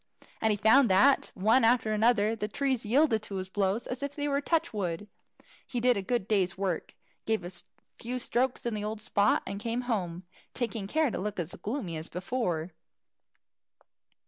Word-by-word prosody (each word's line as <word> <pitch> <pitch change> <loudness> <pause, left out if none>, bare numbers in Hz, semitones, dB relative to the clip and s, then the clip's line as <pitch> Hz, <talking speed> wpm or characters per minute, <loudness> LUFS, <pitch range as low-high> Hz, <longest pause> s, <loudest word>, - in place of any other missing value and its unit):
And 220 - +3
he 210 - +2
found 225 +5 +5
that, 235 +9 +4
one 220 +6 +3
after 225 -2 +3
another, 220 0 +3
the 210 -1 -3
trees 265 +1 -1
yielded 250 -2 +3
to 210 -2 -7
his 185 0 -3
blows 200 +3 0
as 250 +1 -5
if 280 0 -4
they 290 -1 -2
were 280 0 +1
touch 320 -3 0
wood. 195 -1 -3 0.6
He 245 - -2
did 245 +1 +4
a 200 - -1
good 215 0 -1
day's 190 -3 +1
work, 190 -4 -2 0.3
gave 220 -3 +1
a 175 - -5 0.5
few 245 +2 -3
strokes 250 +1 -1
in 235 - -1
the 210 -1 -3
old 215 +1 -3
spot, 205 -1 +2
and 200 - -5
came 230 +2 -1
home, 185 -8 -2 0.3
taking 230 -5 -2
care 310 +3 +1
to - - -3
look 205 0 -3
as 170 0 -2
gloomy 205 - -4
as 160 +2 -6
before. 180 -4 -2
220 Hz, 185 wpm, -29 LUFS, 195-250 Hz, 0.6 s, found